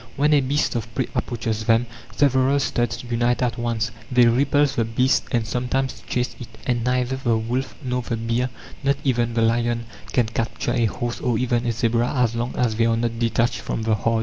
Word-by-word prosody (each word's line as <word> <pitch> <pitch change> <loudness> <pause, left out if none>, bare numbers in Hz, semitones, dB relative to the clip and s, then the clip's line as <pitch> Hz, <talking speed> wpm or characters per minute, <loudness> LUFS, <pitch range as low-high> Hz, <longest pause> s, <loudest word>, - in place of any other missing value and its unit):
When 150 +2 +3
a 145 - +5
beast 140 +3 0
of 115 -1 -3
prey 130 - 0
approaches 110 -2 -2
them, 115 +2 +4 0.3
several 135 0 +3
studs 120 -3 -1
unite 120 +1 0
at 120 -2 -1
once; 115 -1 -1 0.2
they 125 -1 +6
repulse 140 +4 +3
the 120 - +1
beast 125 +4 +1
and 115 -2 +1
sometimes 125 +3 -2
chase 125 0 -1
it: 120 - -7 0.2
and 120 -3 0
neither 125 +1 0
the 120 -4 +1
wolf 125 +4 -2
nor 125 -1 -1
the 120 -1 -3
bear, 115 +3 0 0.3
not 140 0 +1
even 120 -3 +1
the 115 - +3
lion, 115 +1 +1 0.3
can 125 - +3
capture 115 +1 -2
a 115 - +2
horse 120 +2 -3
or 120 -3 +1
even 120 -1 0
a - - +2
zebra 115 +1 +1
as 125 -3 +2
long 120 +1 -3
as 115 -3 0
they 115 0 +3
are 115 0 +2
not 115 0 -1
detached 115 0 +1
from 110 - -3
the 110 0 +2
herd. 115 +2 +1
120 Hz, 205 wpm, -23 LUFS, 115-125 Hz, 0.3 s, they